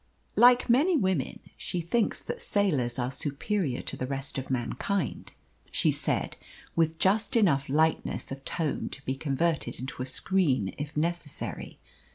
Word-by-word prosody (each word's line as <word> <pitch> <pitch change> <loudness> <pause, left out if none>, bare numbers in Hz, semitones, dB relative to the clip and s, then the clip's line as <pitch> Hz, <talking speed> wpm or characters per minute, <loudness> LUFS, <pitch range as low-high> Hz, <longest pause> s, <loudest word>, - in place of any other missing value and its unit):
"Like 245 0 +6
many 295 +9 +4
women, 185 - 0 0.2
she 180 - -3
thinks 205 +7 0
that 480 - -5
sailors 145 -13 +1
are 125 0 -1
superior 145 - -1
to - - -3
the 130 - -3
rest 135 0 -3
of 130 - -7
mankind," 135 - -2 0.4
she - - +3
said, - - -1 0.4
with 160 -1 +2
just 205 +5 +2
enough 155 - +3
lightness 160 +1 +1
of 135 0 -6
tone 160 0 -2
to 135 - -9
be 130 - 0
converted 140 -1 -1
into 130 0 -6
a 130 - -2
screen 130 - +1
if 150 +1 -5
necessary. 165 -2 -2
155 Hz, 150 wpm, -28 LUFS, 135-190 Hz, 0.4 s, Like